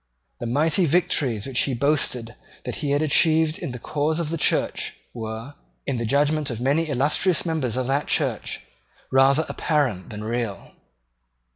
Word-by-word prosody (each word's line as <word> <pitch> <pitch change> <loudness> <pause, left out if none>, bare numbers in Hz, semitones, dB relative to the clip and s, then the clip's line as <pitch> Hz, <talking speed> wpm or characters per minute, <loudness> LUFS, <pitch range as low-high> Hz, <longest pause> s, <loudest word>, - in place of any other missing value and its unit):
The 120 - -4
mighty 155 +8 +2
victories 140 - +1
which 130 -2 -1
he 135 - +1
boasted 125 -3 0 0.3
that - - -4
he 145 - -2
had 145 +2 +2
achieved 155 +1 +3
in - - -4
the 125 - -5
cause 150 +6 -1
of 160 -2 -2
the 165 - -1
Church - - 0 0.2
were, 115 +3 -6 0.3
in 125 - -1
the 115 -1 -2
judgment 145 +3 +2
of 120 -3 -4
many 145 +6 +1
illustrious 150 +7 +1
members 150 -8 -1
of 130 - 0
that 140 +3 0
Church, - - -1 0.5
rather 135 +4 +4
apparent 130 - -1
than 105 0 -6
real. 115 -4 -3
140 Hz, 160 wpm, -24 LUFS, 120-155 Hz, 0.5 s, rather